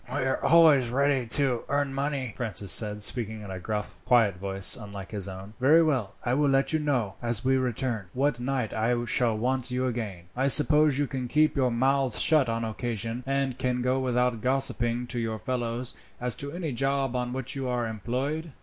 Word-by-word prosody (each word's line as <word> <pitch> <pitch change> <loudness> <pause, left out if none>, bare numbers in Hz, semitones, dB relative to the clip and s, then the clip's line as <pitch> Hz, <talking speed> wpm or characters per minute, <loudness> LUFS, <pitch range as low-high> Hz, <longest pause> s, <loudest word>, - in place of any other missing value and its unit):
"We 145 +1 -1
are 130 - -1
always 150 -6 +5
ready 135 -1 +1
to 130 -1 +1
earn 140 -1 0
money," 135 -4 -2
Francis 105 -5 -3
said, 105 +1 +1
speaking 110 -1 -2
in 100 - -8
a 95 - -5
gruff 105 +3 -5 0.4
voice 95 0 +2
quite - - -10
unlike 100 -1 -9
his 100 -3 -4
own. 95 +2 -9
"Very 155 +6 +5
well. 130 -10 -1
I 120 - +1
will 145 +1 +2
let 135 +3 +2
you 155 - +2
know, 130 -10 -1
as 120 -1 -2
we 130 0 +3
return, 125 -5 -1
what 135 -1 0
night 125 -2 -2
I 120 +2 0
shall 115 -1 +1
want 125 +2 -1
you 125 +1 -1
again. 110 -8 -4
I 130 +2 +1
suppose 150 0 +5
you 145 - +1
can 130 -2 -4
keep 155 +3 +2
your 130 -3 +2
mouths 130 +1 +1
shut 150 -6 +3
on 115 0 -1
occasion, 115 +1 -4
and 135 -2 -1
can 125 -1 -1
go 130 +1 +1
without 125 -2 0
gossiping 125 -2 0
to 120 0 -3
your 110 -1 -2
fellows 120 +2 -3 0.3
as 125 -1 0
to 140 0 -6
any 170 -2 -4
job 135 +1 -1
on 125 0 -2
which 130 0 -4
you 135 -1 -3
are 120 -2 -1
employed?" 130 - -3
125 Hz, 200 wpm, -27 LUFS, 115-135 Hz, 0.4 s, always